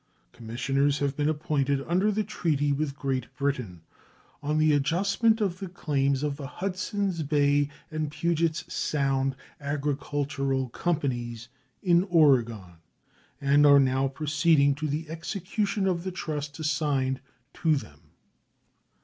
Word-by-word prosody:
Commissioners 135 +5 0
have 140 -1 -1
been 145 +1 +1
appointed 140 -2 0
under 185 +5 +2
the 215 +1 0
treaty 155 -8 0
with 140 0 -1
Great 130 -3 -2
Britain 125 -11 -2 0.6
on 150 +1 -1
the 155 -1 +4
adjustment 195 +10 +2
of 190 -4 -1
the 195 - -5
claims 140 -5 0
of 145 -2 -1
the 140 -3 -6
Hudsons 185 +2 -2
Bay 145 -1 +2 0.2
and 155 -1 -2
Pugets 165 +1 0
Sound 135 -2 0 0.2
Agricultural 140 -2 -2
Companies, 120 -7 -2 0.3
in 175 -1 +5
Oregon, 120 - +2 0.6
and 140 +1 +4
are 140 -1 +8
now 135 0 +2
proceeding 145 +1 +2
to 155 +2 -3
the 155 +3 -3
execution 195 +5 -2
of 175 -3 0
the 185 - -3
trust 150 -5 -4
assigned 140 -4 0 0.3
to 160 -2 +2
them. 80 - -7
145 Hz, 125 wpm, -27 LUFS, 135-165 Hz, 0.6 s, are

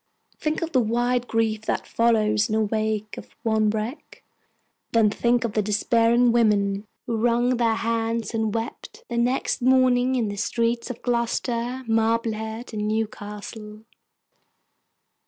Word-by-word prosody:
Think 310 +1 -1
of 330 - -4
the 260 - +3
wide 240 +2 0
grief 225 -1 0
that - - -1
follows 220 -1 +2
in - - -2
the 220 - +2
wake 215 0 -2
of - - -13
one 220 -2 +2
wreck; 220 +7 -5 0.7
then 220 -2 +4
think 240 +3 +1
of 230 -3 -2
the 215 - +2
despairing 230 +3 +3
women 205 -3 +2 0.2
who 230 -2 -2
wrung 240 +2 +2
their 230 -2 +2
hands 230 -1 -1
and 220 -1 0
wept, 225 +2 -6
the 235 - -3
next 250 +3 0
morning, 255 0 +3
in 235 -4 0
the 205 0 -5
streets 235 +2 -1
of 250 - -7
Gloucester, 240 +1 -1
Marblehead, 225 0 -1
and 210 0 -2
Newcastle! 210 0 -5
230 Hz, 140 wpm, -24 LUFS, 215-240 Hz, 0.7 s, then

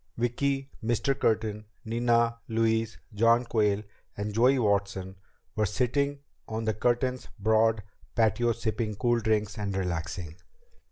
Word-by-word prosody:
Vicki, 135 +3 0 0.2
Mr. 120 +4 +1
Curtin, 110 -3 0 0.2
Nina, 115 0 +2
Louise, 115 0 +1 0.2
John 115 +3 +4
Quayle, 105 -3 +1 0.3
and 105 +1 -3
Joey 125 +5 +4
Watson 100 -4 0 0.4
were 105 -1 +2
sitting 140 +6 0 0.3
on 110 0 -3
the 110 - +1
Curtins' 125 +3 0
broad 110 +1 +3 0.3
patio 115 +1 +3
sipping 110 -1 -2
cool 120 +3 +2
fruit 110 - -10
drinks 105 -1 0
and 100 -2 -2
relaxing. 85 -2 -3
110 Hz, 125 wpm, -28 LUFS, 105-120 Hz, 0.4 s, John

